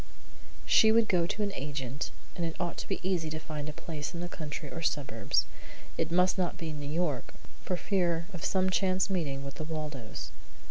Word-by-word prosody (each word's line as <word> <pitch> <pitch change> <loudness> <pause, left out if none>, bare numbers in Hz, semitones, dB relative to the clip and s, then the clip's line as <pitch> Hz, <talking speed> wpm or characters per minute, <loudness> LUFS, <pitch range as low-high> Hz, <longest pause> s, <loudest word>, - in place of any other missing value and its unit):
She 220 -1 +7
would 225 0 +5
go 175 -4 +3
to 210 +2 0
an 200 -1 -1
agent, 140 -2 -3 0.3
and 175 - -2
it 165 -1 -1
ought 175 -1 -1
to - - -4
be - - -1
easy 170 -4 +1
to 155 - -3
find 155 -1 -4
a - - -2
place 150 +1 -5
in - - -3
the 175 - -2
country 150 -3 -5
or 165 - -4
suburbs. 145 -3 +1 0.5
It 165 - 0
must 180 +2 +4
not 180 -2 +1
be 160 -2 -3
New 145 -1 -4
York, 150 -4 0 0.3
for 180 - 0
fear 175 -4 +1
of 175 - -6
some 190 -1 +3
chance 190 +1 +3
meeting 145 -7 0
with 140 +2 -6
the - - -1
Waldos. 150 -7 -4
165 Hz, 200 wpm, -31 LUFS, 150-180 Hz, 0.5 s, She